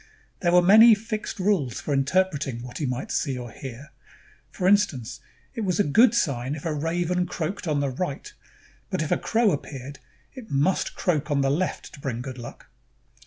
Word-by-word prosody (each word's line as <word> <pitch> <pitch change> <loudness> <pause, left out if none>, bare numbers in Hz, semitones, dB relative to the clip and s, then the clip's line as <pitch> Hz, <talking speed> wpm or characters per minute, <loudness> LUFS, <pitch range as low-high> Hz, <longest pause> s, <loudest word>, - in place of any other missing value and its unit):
There 175 - +1
were 180 0 +6
many 220 +5 +8
fixed 215 0 -5
rules 185 - 0
for 145 - -3
interpreting 140 -4 0
what 125 0 -8
he 150 - -1
might 125 +1 -4
see 135 -4 -1
or 120 -2 -7
hear. 135 +4 -9 0.6
For 180 - -2
instance, 160 - +2 0.3
it 230 - -4
was 190 -3 -1
a - - +5
good 225 - +4
sign 135 - 0
if 150 - -9
a 160 - 0
raven 175 +4 -1
croaked 180 +3 -4
on 150 -2 +1
the 140 - 0
right; 140 +1 -4 0.6
but - - -1
if 155 - -5
a - - +3
crow 225 -2 +2
appeared, 140 -2 -6 0.3
it 250 -5 -11
must 145 +7 0
croak 165 -3 0
on 145 -1 +1
the 135 0 +2
left 175 +6 -2
to 140 - -12
bring 125 -4 -4
good 130 -1 -7
luck. 120 - -10
150 Hz, 190 wpm, -25 LUFS, 135-185 Hz, 0.6 s, many